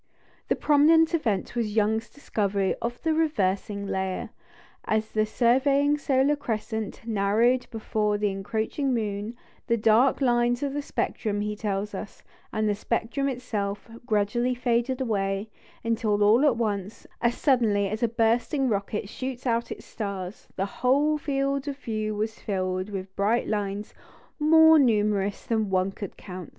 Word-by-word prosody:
The - - +2
prominent 315 +3 +4
event 225 - -1
was 220 -3 -1
Young's 220 +1 +1
discovery 200 -8 -1
of 240 +1 -3
the 320 -1 +2
"reversing 200 -10 0
layer." 190 -1 -3 0.5
As 220 0 0
the 215 0 +1
surviving 275 +5 +3
solar 275 +1 +2
crescent 220 -4 -4
narrowed 225 +4 +2
before 215 -2 -1
the 205 -1 0
encroaching 220 +7 -2
moon, 210 0 -3 0.3
"the 235 -1 +2
dark 225 +4 +4
lines 240 -1 +2
of 280 -1 -1
the 290 - -2
spectrum," 210 -6 -2
he 210 0 -2
tells 205 -1 -3
us, 200 +1 -8 0.3
"and 215 0 0
the 210 - +2
spectrum 235 +6 -1
itself, 210 -6 -3 0.2
gradually 235 +4 +1
faded 245 +1 0
away, 200 -3 -1 0.3
until 225 -2 +1
all 220 +6 +5
at 265 -6 +3
once, 205 -3 -3 0.2
as 235 0 +2
suddenly 225 -8 +2
as 215 +3 -4
a 235 - +3
bursting 235 +5 +1
rocket 200 0 -2
shoots 255 +3 -6
out 235 -1 0
its - - -7
stars, 200 -2 -6
the 195 - -1 0.2
whole 290 +4 +3
field 275 -1 -1
of 280 -1 -3
view 215 -5 -3
was 215 +1 -3
filled 185 -1 -2
with 190 -1 -6
bright 215 +4 +1
lines 205 -1 -3 0.5
more 320 +1 +7
numerous 210 -5 +1
than 220 -3 0
one 185 0 +1
could 200 -1 -8
count. 180 -4 -8
220 Hz, 150 wpm, -26 LUFS, 205-255 Hz, 0.5 s, more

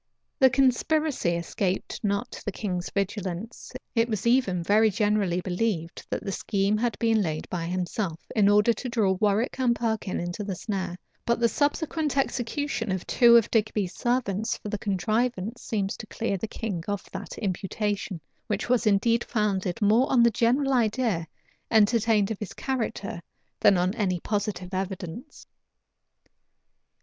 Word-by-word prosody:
The 265 -2 +7
conspiracy 265 - +2
escaped 180 +4 -2
not 200 -1 -2
the 205 - -2
king's 185 -3 -3
vigilance: 200 +1 -4 0.2
it 230 0 +2
was 215 -2 -2
even 235 -8 +2
very 215 +4 +4
generally 205 -3 +1
believed, 180 -2 -2
that - - -3
the 195 - -3
scheme 200 +1 0
had 235 +2 -1
been 225 -2 +2
laid 155 -4 -2
by 170 -2 -2
himself, 180 -1 -2 0.2
in 205 -2 +5
order 210 +3 +5
to 250 - -5
draw 220 -5 +2
Warwick 215 +5 +1
and 245 -2 +3
Perkin 220 -5 -2
into 175 +4 -4
the 195 -2 -3
snare; 185 -2 -3 0.3
but 235 0 +1
the 235 - +4
subsequent 295 +2 0
execution 245 -3 -1
of 185 -1 -2
two 235 -2 +6
of 230 - +2
Digby's 210 -4 0
servants 235 -3 -1
for 210 - -7
the 210 -1 -3
contrivance 215 +3 -1
seems 200 -3 -2
to 220 - -8
clear 220 -2 -2
the 210 +4 -3
king 205 -7 -4
of 205 -1 -3
that 190 +1 -7
imputation, 200 -1 -2 0.3
which 210 +2 -2
was 245 -2 +2
indeed 230 +3 +3
founded 200 -2 -1
more 225 +6 +4
on 245 -3 +5
the 235 - +5
general 255 +5 +2
idea 220 -7 +1 0.4
entertained 220 -1 +3
of 215 - -4
his 210 - -6
character 230 -8 -3 0.4
than 200 - +5
on 180 +2 +1
any 190 -6 0
positive 195 -2 -3
evidence. 190 - -5
210 Hz, 155 wpm, -26 LUFS, 190-235 Hz, 0.4 s, The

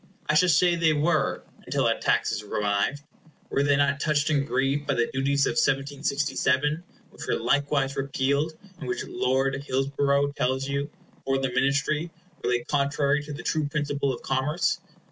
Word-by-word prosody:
I - - +2
shall 180 +4 +4
say 175 +2 +4
they 165 -2 +3
were, 155 -1 +1 0.2
until - - -1
that - - +1
tax - - +2
is 105 - -2
revived. 105 +7 -1 0.5
Were 140 - +2
they 140 0 +3
not 140 0 +2
touched 150 +1 +1
and 140 -2 +1
grieved 140 +1 0
by - - +1
the 120 - +2
duties 140 +1 +2
of - - +1
1767, 145 +2 0 0.3
which - - -9
were - - +1
likewise 140 -1 +1
repealed, 140 +3 0 0.2
and 135 - -6
which 125 - -2
Lord 135 +2 0
Hillsborough 140 +1 +1
tells 130 -1 -1
you, 140 +1 -2 0.3
for 135 0 +1
the 135 -1 -1
Ministry, 140 +5 +1 0.3
were - - 0
laid 120 -1 0
contrary 140 0 +1
to 150 - -7
the 145 - -7
true 155 -2 0
principle 145 -2 -1
of 120 - -7
commerce? 150 +7 0
140 Hz, 170 wpm, -26 LUFS, 135-150 Hz, 0.5 s, shall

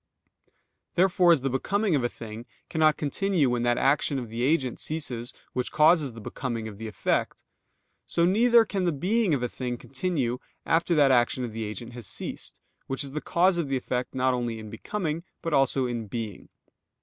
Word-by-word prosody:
_ - - -42 0.4
Therefore 180 -1 +4
as 160 -6 +4
the 135 - 0
becoming 200 - 0
of 140 -4 +2
a 120 - +1
thing 115 +1 -9 0.2
cannot 155 -1 +3
continue 155 -1 +1
when 120 -1 0
that 120 0 +2
action 140 +1 +2
of 120 -4 -5
the 115 +2 -4
agent 130 -2 +1
ceases 125 -7 -2 0.2
which 125 -1 -2
causes 155 -3 +4
the 115 - -9
becoming 115 0 -4
of 105 -2 -9
the 115 - -5
effect: 105 - -1 0.6
so 170 - +2
neither 230 +5 +5
can 195 -3 -2
the 175 - +2
being 185 +4 +1
of 125 - -3
a - - +1
thing 125 0 -4
continue 135 -3 -2 0.3
after 165 +1 +2
that 145 -3 +5
action 125 0 +3
of 120 -3 -4
the 110 0 -3
agent 110 +3 -6
has 120 -4 -8
ceased, - - -4 0.3
which 135 +2 -2
is 140 - -6
the 150 +2 -3
cause 175 +1 +2
of 155 -5 -2
the 135 - +1
effect 125 0 -3
not 130 0 +2
only 120 -2 -2
in 110 -1 -9
becoming 170 -6 -3 0.2
but 165 - -2
also 135 -1 +3
in 120 -4 -4
_being. 110 -1 -5
135 Hz, 195 wpm, -27 LUFS, 120-165 Hz, 0.6 s, neither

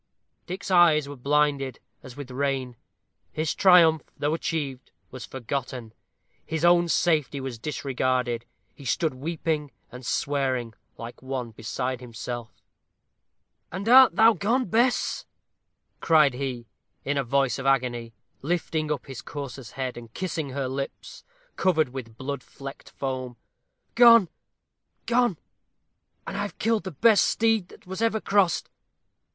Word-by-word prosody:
Dick's 190 +2 -5
eyes 165 -5 +5
were 145 - -7
blinded, 140 -1 0 0.2
as 130 -1 -12
with 140 -3 -8
rain. 130 -2 -2 0.6
His 155 0 -1
triumph, 170 -4 +6 0.2
though 145 +1 0
achieved, 145 -6 -3 0.2
was 125 -3 -8
forgotten 125 -3 -5 0.5
his 160 +1 -2
own 175 0 +5
safety 155 -5 +1
was 130 -3 -6
disregarded. 130 -4 -1 0.3
He 140 - -14
stood 150 +4 0
weeping 155 +1 -2 0.2
and 125 +2 -10
swearing, 130 +1 -1 0.2
like 115 +1 -9
one 130 -3 -4
beside 125 +3 -4
himself. 120 -1 -6 1.2
"And 190 +4 -5
art 260 +2 +8
thou 225 +1 +6
gone, 230 +7 0
Bess?" 235 +6 +1 0.7
cried 155 -5 +4
he, 125 -2 -4 0.4
in 145 - 0
a - - 0
voice 135 0 +1
of 135 - -3
agony, 120 -4 0 0.3
lifting 155 -1 -1
up 145 -4 -3
his 135 -3 -8
courser's 140 -3 -8
head, 130 -2 -4
and 115 -2 -10
kissing 165 -6 -3
her 135 0 -3
lips, 135 +1 -6 0.3
covered 160 -7 +2
with 120 -4 -8
blood 140 +3 -4
flecked 135 0 -10
foam. 130 -2 -5 0.6
"Gone, 230 -6 +7 0.8
gone! 240 -6 +2 0.9
and - - -6
I 200 - -2
have 205 - -5
killed 225 -1 0
the 190 - -4
best 210 - +5
steed 225 -4 +1
that 220 - -17
was 190 +3 -6
ever 225 -1 +2
crossed! 200 -5 +2
140 Hz, 135 wpm, -26 LUFS, 130-175 Hz, 1.2 s, art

